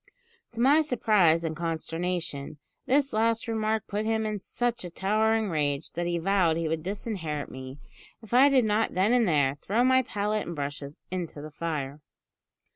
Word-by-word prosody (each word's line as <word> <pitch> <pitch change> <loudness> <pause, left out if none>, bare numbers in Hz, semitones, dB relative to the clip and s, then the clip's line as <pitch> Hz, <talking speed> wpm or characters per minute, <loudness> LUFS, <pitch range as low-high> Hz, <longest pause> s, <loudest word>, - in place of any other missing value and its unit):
"To 230 - -8
my 280 +6 +5
surprise 210 - +3
and 160 -1 -2
consternation, 165 -2 -3 0.3
this 275 +1 +2
last 225 +2 +1
remark 220 -1 -1
put 210 +1 -2
him 220 0 0
in 215 -1 -2
such 240 +3 -2
a 180 - -5
towering 215 +3 +1
rage, 145 -2 -1
that 175 +1 -3
he 175 0 0
vowed 175 -2 +2
he 165 -1 -1
would 160 0 -1
disinherit 180 -5 -4
me, 130 +1 -8 0.4
if 225 0 -12
I 265 +3 +7
did 260 -4 +4
not 215 +1 +1
then 195 +6 +3
and 240 -3 +3
there 145 -3 +2
throw 225 +5 +1
my 260 0 +5
palette 210 -1 -2
and 170 - -5
brushes 145 0 -5
into 175 -5 -4
the 155 +1 -8
fire. 150 -3 -4
190 Hz, 175 wpm, -27 LUFS, 160-220 Hz, 0.4 s, I